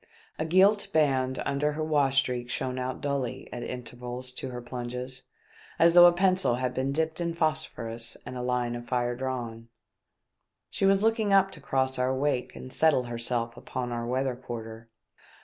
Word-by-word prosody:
A 155 - 0
gilt 195 +5 +4
band 130 -4 +2
under 150 +2 0
her 155 +1 -2
wash 145 -4 +2
streak 125 -2 +1
shone 130 0 -2
out 130 0 -3
dully 140 -4 -2
at 120 - -5
intervals 125 +1 -6
to 130 +1 -6
her 125 -1 -6
plunges, 125 +1 -5 0.6
as 170 0 +5
though 175 0 +10
a - - +7
pencil 185 -6 +2
had 125 0 -2
been 130 +2 -1
dipped 160 +3 0
in 170 -1 -1
phosphorus 120 -8 -2
and - - -7
a 125 - -4
line 125 -1 -1
of 120 0 -7
fire 120 -1 0
drawn. 120 -3 -4 1.0
She 195 - +1
was 195 +1 +4
looking 220 -2 +2
up 195 0 +5
to - - -11
cross 130 -1 0
our 130 +1 +1
wake 130 -2 -1
and 130 - -9
settle 155 -5 +4
herself 115 0 -1
upon 125 0 -5
our 120 0 -3
weather 130 +1 0
quarter. 115 -2 -8
130 Hz, 175 wpm, -28 LUFS, 120-155 Hz, 1.0 s, though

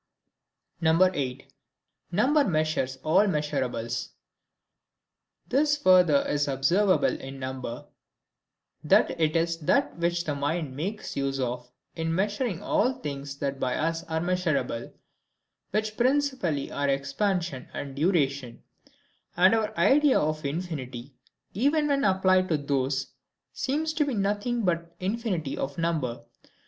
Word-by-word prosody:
8. 160 -6 +1 0.6
Number 270 - +3
measures 155 - 0
all 185 +7 +4
Measurables. 130 - -2 1.4
This 290 +2 +2
further 180 - +5
is 145 0 0
observable 170 +9 +2
in 135 +1 -8
number, 130 -2 -5 1.0
that - - +4
it 155 0 +2
is 165 0 +1
that 275 - +1
which 170 0 0
the 155 - -2
mind 145 0 -2
makes 195 +9 -4
use 135 -1 -1
of 125 -1 -3 0.3
in 165 0 -1
measuring 205 0 -1
all 255 - +2
things 140 - -6
that 140 -1 -3
by 130 -1 0
us 165 +1 -1
are 160 0 -2
measurable, 170 -9 -1 0.8
which 215 +1 -1
principally 255 - +1
are 140 0 -1
EXPANSION 140 +2 -1
and 140 -1 -6
DURATION; 140 -6 0 0.7
and 185 +3 +6
our 220 -1 +1
idea 270 - +5
of 155 0 -1
infinity, 140 -5 -5 0.4
even 285 - +2
when 280 -1 +1
applied 185 -1 +3
to 160 - +2
those, 135 -1 -1 0.4
seems 310 +3 -1
to 310 -1 +2
be 275 -4 -2
nothing 210 +4 0
but 170 -1 -2
the 185 - -7
infinity 195 - -2
of 135 +1 -4
number. 160 -8 -1
165 Hz, 125 wpm, -27 LUFS, 140-200 Hz, 1.4 s, and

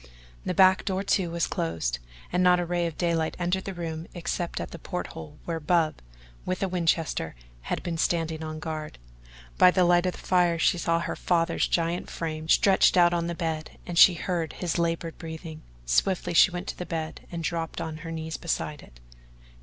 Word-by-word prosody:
The - - -1
back 190 -1 +6
door, 190 0 -1
too, 190 -3 +1
was 170 0 0
closed, 80 -7 -2 0.3
and 180 - +2
not 180 -1 +5
a 175 - -1
ray 175 0 0
of 165 - -7
daylight 165 -2 0
entered 180 +2 -1
the 195 - -4
room 165 -1 -5
except 175 0 -3
at - - -5
the 170 - -8
port 180 +3 -4
hole 155 -2 -9
where 165 -1 -2
Bub, 160 0 +1 0.5
with 185 +1 -2
a - - +2
Winchester, 165 - 0 0.3
had - - -2
been 165 -2 -3
standing 160 -2 0
on 155 0 -5
guard. 155 -1 -5 0.6
By - - +9
the 180 0 +3
light 175 +1 +4
of 180 - 0
the - - -10
fire 175 -2 +2
she 170 +1 +2
saw 165 0 +1
her - - -3
father's 170 -1 +1
giant 170 +1 -1
frame 160 -1 -5
stretched 190 0 +5
out 175 -1 +6
on 170 -1 0
the 170 - -3
bed 160 -2 -4
and 175 - -5
she 175 +1 +8
heard 170 -2 -2
his 175 -1 -2
laboured 165 -1 -1
breathing. 160 -1 -7 0.2
Swiftly 175 - +1
she 170 - +7
went 175 0 -5
to - - -5
the 180 - -3
bed 160 -1 -5
and 170 -1 -4
dropped 165 -1 -3
on 160 -1 -4
her 165 +1 -8
knees 160 0 -4
beside 150 -3 -3
it. - - -17
170 Hz, 200 wpm, -27 LUFS, 160-175 Hz, 0.6 s, By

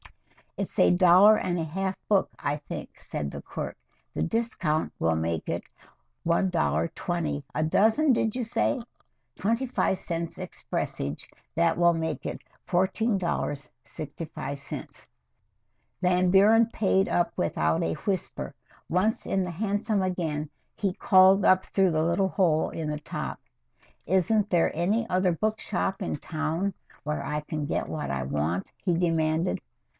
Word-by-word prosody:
"It's - - -4
a - - +6
dollar 185 +4 +7
and 175 -3 -1
a - - 0
half 190 +4 -2
book, 200 -2 +3
I 145 +1 -1
think," 145 - -8
said 70 -1 -4
the - - -7
clerk. - - -6 0.4
"The - - 0
discount 185 -7 -1
will 80 0 +2
make 80 0 -2
it - - -2 0.6
$1.20 170 -2 0
a 155 - +1
dozen, 220 - +3
did 225 -2 +1
you 255 - -1
say? 240 +3 0 0.5
Twenty 230 +6 0
five 240 -6 0
cents 170 -1 -4
expressage 70 +2 -4 0.3
that 85 - +2
will 170 0 +5
make 160 -1 -3
it - - -4 0.3
$14.65." 155 - -2 1.0
Van 180 0 +3
Buren 215 +4 +6
paid 195 -3 +1
up 170 -1 +1
without 80 -1 +1
a 80 - 0
whimper. 190 - -3 0.4
Once 190 +6 +1
in 190 -1 0
the 180 - -4
hansom 205 +3 0
again, 160 -5 -2 0.3
he 200 -2 0
called 190 +1 +5
up 185 0 +5
through 190 -2 +2
the 155 0 +1
little 170 +4 +2
hole 170 -6 +2
in 160 -2 -4
the 150 0 -3
top. 150 - -5 0.7
"Isn't 200 +4 +2
there 170 -4 +2
any 205 +8 +1
other 185 0 +2
book 215 +6 -1
shop 195 +1 -2
in 180 - -2
town 160 +6 -2 0.3
where 150 -1 -2
I 150 +2 -2
can 150 0 -4
get - - -1
what 155 -1 -3
I 65 -1 -1
want?" 75 +6 -1
he 175 -3 +1
demanded. 165 0 +1
175 Hz, 140 wpm, -27 LUFS, 155-195 Hz, 1.0 s, dollar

